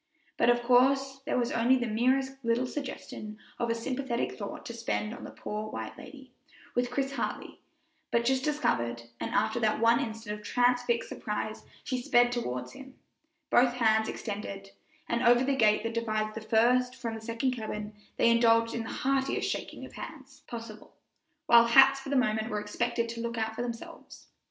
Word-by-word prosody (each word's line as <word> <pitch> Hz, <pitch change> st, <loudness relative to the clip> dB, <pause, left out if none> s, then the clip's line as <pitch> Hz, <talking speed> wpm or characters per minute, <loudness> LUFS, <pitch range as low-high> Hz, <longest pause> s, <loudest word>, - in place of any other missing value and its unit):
But -, -, +3 dB
of 240 Hz, 0 st, +3 dB
course 265 Hz, +2 st, +3 dB
there -, -, +1 dB
was 240 Hz, -1 st, 0 dB
only 235 Hz, +3 st, +3 dB
the 245 Hz, -2 st, 0 dB
merest 265 Hz, +4 st, 0 dB
little 230 Hz, +2 st, +1 dB
suggestion 250 Hz, -6 st, -6 dB, 0.2 s
of 235 Hz, -, 0 dB
a 230 Hz, -, +1 dB
sympathetic 250 Hz, +1 st, -2 dB
thought 200 Hz, -2 st, -7 dB
to 235 Hz, -, -6 dB
spend 225 Hz, -1 st, -2 dB
on -, -, -10 dB
the -, -, -7 dB
poor, 215 Hz, +1 st, -5 dB
white 110 Hz, -, -6 dB
lady, 265 Hz, -1 st, -12 dB, 0.4 s
with 245 Hz, 0 st, 0 dB
Chris 270 Hz, +2 st, -1 dB
Hartley 275 Hz, -, -4 dB, 0.5 s
but 235 Hz, 0 st, +1 dB
just 260 Hz, +1 st, +2 dB
discovered, 120 Hz, -, 0 dB, 0.2 s
and -, -, -3 dB
after 250 Hz, 0 st, +1 dB
that 215 Hz, -2 st, +1 dB
one 230 Hz, +1 st, +4 dB
instant 220 Hz, -2 st, -4 dB
of -, -, -16 dB
transfixed 245 Hz, +1 st, +1 dB
surprise 215 Hz, +1 st, -4 dB, 0.2 s
she 255 Hz, -1 st, -2 dB
sped 245 Hz, -2 st, +4 dB
toward 125 Hz, -, -3 dB
him, 270 Hz, -1 st, -12 dB, 0.6 s
both 245 Hz, 0 st, +5 dB
hands 220 Hz, -2 st, +3 dB
extended; 200 Hz, -2 st, -6 dB, 0.4 s
and 235 Hz, -, 0 dB
over 245 Hz, 0 st, +5 dB
the 275 Hz, +1 st, +1 dB
gate 215 Hz, -4 st, +3 dB
that 230 Hz, 0 st, -3 dB
divides 215 Hz, -2 st, -1 dB
the 225 Hz, -, -6 dB
first 245 Hz, +3 st, +3 dB
from 240 Hz, -3 st, -4 dB
the 225 Hz, -, -7 dB
second 230 Hz, +3 st, -1 dB
cabin 215 Hz, -3 st, -5 dB, 0.2 s
they 235 Hz, -, +5 dB
indulged 230 Hz, -1 st, +4 dB
in 235 Hz, -, -2 dB
the 225 Hz, -, -6 dB
heartiest 270 Hz, 0 st, 0 dB
shaking -, -, -5 dB
of -, -, -13 dB
hands -, -, -10 dB
possible, 230 Hz, -2 st, -9 dB, 0.5 s
while 235 Hz, 0 st, +7 dB
hats 270 Hz, +3 st, +7 dB
for 270 Hz, -, -8 dB
the 280 Hz, -, 0 dB
moment 220 Hz, -3 st, +1 dB
were 210 Hz, -, -1 dB
expected 235 Hz, +3 st, -1 dB
to 230 Hz, 0 st, -5 dB
look 235 Hz, 0 st, -3 dB
out 220 Hz, 0 st, -1 dB
for -, -, -3 dB
themselves. 235 Hz, -1 st, -8 dB
235 Hz, 185 wpm, -29 LUFS, 220-250 Hz, 0.6 s, while